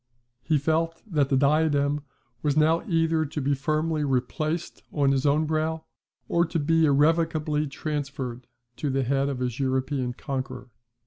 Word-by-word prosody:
He 155 Hz, -, +1 dB
felt 160 Hz, +3 st, 0 dB
that 150 Hz, -9 st, +1 dB
the 135 Hz, -, +3 dB
diadem 145 Hz, 0 st, +2 dB, 0.4 s
was 145 Hz, -1 st, 0 dB
now 160 Hz, +2 st, +4 dB
either 165 Hz, -3 st, +2 dB
to 150 Hz, 0 st, -4 dB
be 140 Hz, 0 st, +1 dB
firmly 155 Hz, +2 st, 0 dB
replaced 155 Hz, +5 st, -2 dB
on 140 Hz, -2 st, +2 dB
his 135 Hz, +1 st, +1 dB
own 150 Hz, +2 st, +3 dB
brow, 160 Hz, +1 st, -1 dB, 0.4 s
or 170 Hz, -, +2 dB
to 165 Hz, 0 st, -2 dB
be 165 Hz, +1 st, +3 dB
irrevocably 155 Hz, +1 st, +2 dB
transferred 140 Hz, -4 st, -4 dB, 0.3 s
to 145 Hz, -, -2 dB
the 135 Hz, 0 st, +1 dB
head 135 Hz, +2 st, +1 dB
of 135 Hz, -, -3 dB
his 125 Hz, 0 st, -3 dB
European 130 Hz, -1 st, -1 dB
conqueror. 130 Hz, -2 st, -5 dB
150 Hz, 150 wpm, -26 LUFS, 135-160 Hz, 0.4 s, now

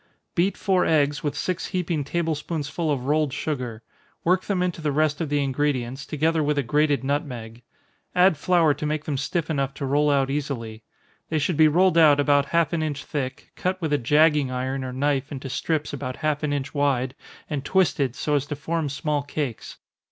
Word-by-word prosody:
Beat 185 Hz, +3 st, +1 dB
four 190 Hz, -2 st, +2 dB
eggs, 145 Hz, -2 st, +2 dB
with 145 Hz, -2 st, -2 dB
six 180 Hz, +4 st, -2 dB
heaping 175 Hz, -5 st, -1 dB
table 165 Hz, +3 st, -1 dB
spoonsful 155 Hz, +1 st, -3 dB
of 130 Hz, -3 st, -2 dB
rolled 150 Hz, 0 st, +1 dB
sugar 125 Hz, -7 st, -4 dB, 0.4 s
work 185 Hz, +2 st, +2 dB
them 190 Hz, -3 st, 0 dB
into 175 Hz, -2 st, -2 dB
the 150 Hz, -2 st, 0 dB
rest 155 Hz, +1 st, +1 dB
of 160 Hz, -, -2 dB
the 145 Hz, -1 st, +1 dB
ingredients, 135 Hz, -1 st, -1 dB
together 160 Hz, +1 st, +1 dB
with 150 Hz, 0 st, 0 dB
a 140 Hz, -, +2 dB
grated 145 Hz, +1 st, +2 dB
nutmeg 125 Hz, -5 st, -3 dB, 0.5 s
add 180 Hz, -1 st, +5 dB
flour 165 Hz, 0 st, +3 dB
to 150 Hz, +1 st, -4 dB
make 150 Hz, 0 st, -2 dB
them 150 Hz, -, -2 dB
stiff 150 Hz, +4 st, -1 dB
enough 140 Hz, -3 st, -1 dB
to 140 Hz, -, -4 dB
roll 145 Hz, +2 st, +2 dB
out 135 Hz, -2 st, +2 dB
easily. 120 Hz, -7 st, -4 dB, 0.5 s
They 160 Hz, -, 0 dB
should 155 Hz, +3 st, 0 dB
be 155 Hz, +1 st, +6 dB
rolled 175 Hz, +2 st, +4 dB
out 150 Hz, -3 st, +6 dB
about 145 Hz, 0 st, +3 dB
half 170 Hz, 0 st, +1 dB
an 165 Hz, -, 0 dB
inch 145 Hz, -3 st, -3 dB
thick, 130 Hz, -3 st, -4 dB
cut 185 Hz, +1 st, -1 dB
with 160 Hz, -4 st, -1 dB
a 145 Hz, -, +3 dB
jagging 150 Hz, +2 st, +3 dB
iron 130 Hz, +1 st, -2 dB
or 130 Hz, -, -4 dB
knife 140 Hz, +1 st, 0 dB
into 135 Hz, -2 st, -6 dB
strips 155 Hz, +2 st, -1 dB
about 130 Hz, -2 st, -4 dB
half 155 Hz, -1 st, -1 dB
an 150 Hz, -2 st, -1 dB
inch 140 Hz, -1 st, -3 dB
wide, 135 Hz, -3 st, +1 dB, 0.3 s
and 145 Hz, -3 st, -3 dB
twisted, 145 Hz, -7 st, +1 dB
so 150 Hz, -, -1 dB
as 145 Hz, -1 st, +1 dB
to 145 Hz, -, -3 dB
form 160 Hz, +1 st, -2 dB
small 145 Hz, +2 st, -1 dB
cakes. 140 Hz, -4 st, -5 dB
145 Hz, 200 wpm, -24 LUFS, 135-160 Hz, 0.5 s, be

